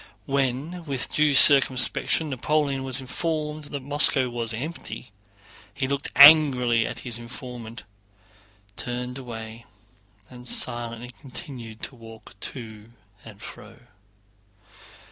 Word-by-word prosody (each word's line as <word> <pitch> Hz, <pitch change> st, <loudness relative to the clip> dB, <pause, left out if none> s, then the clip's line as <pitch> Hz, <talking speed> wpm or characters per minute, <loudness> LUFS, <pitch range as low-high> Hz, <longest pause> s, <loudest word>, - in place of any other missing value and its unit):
When 140 Hz, +6 st, -2 dB
with 135 Hz, -4 st, -4 dB
due 150 Hz, -2 st, +2 dB
circumspection 140 Hz, +3 st, +5 dB
Napoleon 140 Hz, +1 st, -1 dB
was 130 Hz, 0 st, -1 dB
informed 150 Hz, +2 st, -4 dB
that 145 Hz, -2 st, -7 dB
Moscow 140 Hz, -2 st, +2 dB
was 115 Hz, -2 st, -4 dB
empty, 125 Hz, -2 st, -7 dB, 0.6 s
he 135 Hz, -1 st, -2 dB
looked 140 Hz, +1 st, -3 dB
angrily 130 Hz, -6 st, +7 dB
at 120 Hz, -, -6 dB
his 120 Hz, -2 st, -6 dB
informant, 120 Hz, -1 st, -9 dB, 0.9 s
turned 125 Hz, +1 st, -5 dB
away, 115 Hz, -2 st, -9 dB, 0.6 s
and 125 Hz, -1 st, -13 dB
silently 120 Hz, 0 st, -1 dB
continued 125 Hz, -5 st, -9 dB
to 135 Hz, -, -5 dB
walk 115 Hz, -2 st, -14 dB, 0.2 s
to 110 Hz, -4 st, -11 dB, 0.3 s
and 105 Hz, -2 st, -14 dB
fro. 110 Hz, +2 st, -12 dB
125 Hz, 105 wpm, -24 LUFS, 115-140 Hz, 0.9 s, angrily